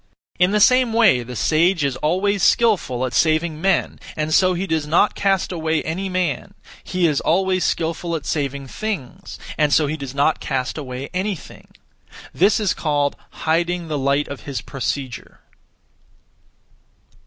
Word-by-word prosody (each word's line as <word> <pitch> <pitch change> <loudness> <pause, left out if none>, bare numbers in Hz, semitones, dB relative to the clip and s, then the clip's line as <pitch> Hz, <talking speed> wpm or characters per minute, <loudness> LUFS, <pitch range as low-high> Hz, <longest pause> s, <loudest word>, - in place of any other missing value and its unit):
In 180 0 +5
the 210 +1 +1
same 250 +1 +4
way 220 - +4
the 125 +1 -8
sage 165 +5 +2
is 140 -2 0
always 190 +5 0
skilful 180 - +2
at 125 - -5
saving 155 -1 +1
men, 190 -1 +1 0.2
and 155 0 -1
so 185 +1 +4
he 185 +3 -2
does 160 -4 -1
not 170 +7 +3
cast 195 -2 0
away 160 -2 -1
any 185 +5 -3
man; 185 +1 -2 0.3
he 185 -1 0
is 150 -4 +1
always 185 +1 +1
skilful 165 +1 -1
at 150 - -5
saving 140 -2 -2
things, 175 - -6 0.2
and 150 -1 +3
so 150 - +4
he 150 +2 -2
does 140 -2 -7
not 145 +3 +2
cast 130 -3 -2
away 130 -2 -6
anything. 190 -1 -4 0.7
This 200 +5 +3
is 205 -5 +1
called 145 -2 0 0.3
'Hiding 170 +1 0
the 150 -2 -1
light 140 +2 +1
of 140 - -7
his 135 - -3
procedure.' 135 -1 -5
160 Hz, 155 wpm, -21 LUFS, 140-185 Hz, 0.7 s, In